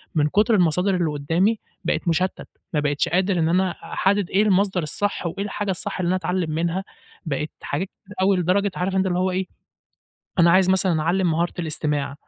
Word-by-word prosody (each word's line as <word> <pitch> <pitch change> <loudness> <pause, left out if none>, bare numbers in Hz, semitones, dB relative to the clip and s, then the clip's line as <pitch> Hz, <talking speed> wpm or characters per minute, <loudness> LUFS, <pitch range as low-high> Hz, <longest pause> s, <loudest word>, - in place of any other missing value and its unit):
من 150 -1 +3
كتر 210 +6 +3
المصادر 180 +2 +2
اللي 170 -3 +1
قدامي 170 +10 +1 0.2
بقيت - - -1
مشتت 180 +3 0 0.3
ما 150 - +2
بقيتش 145 0 0
قادر 185 +1 +1
إن 160 0 +2
أنا 185 +1 +2
أحدد 195 +1 -1
إيه 200 +3 +3
المصدر 195 -3 +2
الصح 200 +6 -2
وإيه 195 +4 -4
الحاجة 205 -1 -2
الصح 185 - -4
اللي 175 - 0
أنا 185 - +2
أتعلم 180 -2 -1
منها، 170 +4 -1 0.4
بقيت 150 0 -2
حاجات 175 +7 -3
كتير 205 +1 -17
أوي 190 0 +3
لدرجة 190 +3 +1
عارف 185 +2 -1
أنت 190 0 +2
اللي 180 -1 0
هو 185 0 +1
إيه. 185 +1 -1 0.9
أنا 170 0 +6
عايز 185 +1 +4
مثلًا 185 -4 +2
أعلم 175 +1 +1
مهارة 170 +2 0
الاستماع 150 -3 -2
180 Hz, 190 wpm, -23 LUFS, 165-190 Hz, 0.9 s, أنا